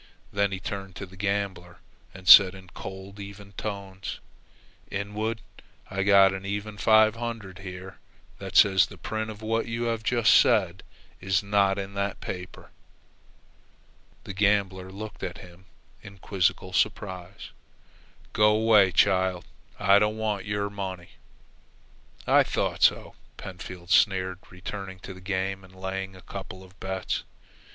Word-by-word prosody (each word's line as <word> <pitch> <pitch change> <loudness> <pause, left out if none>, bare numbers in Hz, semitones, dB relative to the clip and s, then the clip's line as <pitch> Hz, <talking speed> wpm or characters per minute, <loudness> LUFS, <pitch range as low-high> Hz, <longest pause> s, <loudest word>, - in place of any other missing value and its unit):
Then 100 -1 +1
he 95 - -4
turned 95 -1 -6
to 100 - -6
the 95 0 -16
gambler 95 -3 -3 0.3
and 95 -1 -13
said 95 -1 +10
in 95 -1 -13
cold, 95 +2 -9
even 100 0 -10
tones: 100 -2 -6 0.7
"Inwood, 105 +3 -3 0.5
I've 100 0 -1
got 100 -1 +6
an 95 0 -6
even 100 +1 -5
five 110 0 +5
hundred 115 -6 -6
here 95 0 -9 0.4
that 95 -2 -8
says 95 -1 +6
the 100 - -13
print 110 +5 -4
of 110 0 -9
what 115 +1 -1
you 115 +1 -3
have 115 -1 -1
just 115 0 +3
said 95 -2 +4 0.4
is 95 -1 0
not 100 -1 +2
in 100 0 -5
that 100 0 -2
paper." 90 0 -8 1.5
The 100 - -7
gambler 95 -2 +1
looked 105 +2 -8
at - - -5
him 90 +1 -14 0.4
in 100 0 -12
quizzical 95 -1 -1
surprise. 95 -1 -2 0.8
"Go 105 0 +4
'way, 110 -4 +5
child. 95 0 +2 0.3
I 100 +2 +5
don't 105 +1 0
want 105 -3 -2
your 100 0 -2
money." 95 -3 -6 1.2
"I - - +5
thought - - -1
so," - - +3 0.2
Pentfield 90 -1 -9
sneered, 95 -2 +3
returning 95 +1 -7
to 95 - -8
the 95 - -13
game 95 +1 -2
and 95 0 -17
laying 95 0 -5
a 90 - -14
couple 95 0 -8
of 95 +1 -18
bets. 95 0 -3
95 Hz, 145 wpm, -26 LUFS, 95-105 Hz, 1.5 s, said